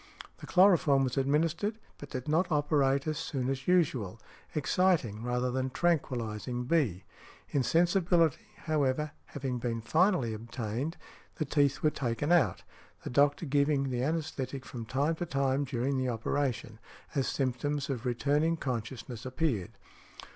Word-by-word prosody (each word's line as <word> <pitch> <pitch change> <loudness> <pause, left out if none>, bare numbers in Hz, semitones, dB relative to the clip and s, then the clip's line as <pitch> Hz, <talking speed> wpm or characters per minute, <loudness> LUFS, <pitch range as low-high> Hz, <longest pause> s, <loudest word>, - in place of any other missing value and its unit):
The - - -9
chloroform 175 -7 +5
was 130 -2 -1
administered, 160 +10 +1 0.2
but 145 - -9
did 130 +1 -5
not 170 +4 +1
operate 140 -2 +2
as 155 -1 -2
soon 130 -2 -2
as 135 0 -5
usual, 130 - +1 0.4
exciting 150 - +1
rather 125 +1 -1
than 130 +1 -1
tranquilizing 125 -7 -1
B. 125 - +1 0.5
Insensibility, 170 +2 +2 0.2
however, 150 -1 0
having 130 -3 -4
been 115 -1 -2
finally 160 - +2
obtained, 115 +6 -4 0.4
the 155 - -2
teeth 140 -1 +1
were 155 - +4
taken 135 +3 -2
out, 140 - +3 0.4
the - - -5
doctor 145 +5 +3
giving 140 -1 +1
the 125 - -1
anæsthetic 140 -3 -2
from 115 -3 -7
time 140 +7 +1
to 175 - -2
time 140 -1 +1
during 130 +1 -1
the 130 -1 0
operation, 115 -1 -2 0.3
as 135 -3 0
symptoms 140 +2 -1
of 130 -5 -3
returning 145 +6 +1
consciousness 125 -2 -4
appeared. 130 - -1
140 Hz, 135 wpm, -30 LUFS, 125-155 Hz, 0.5 s, chloroform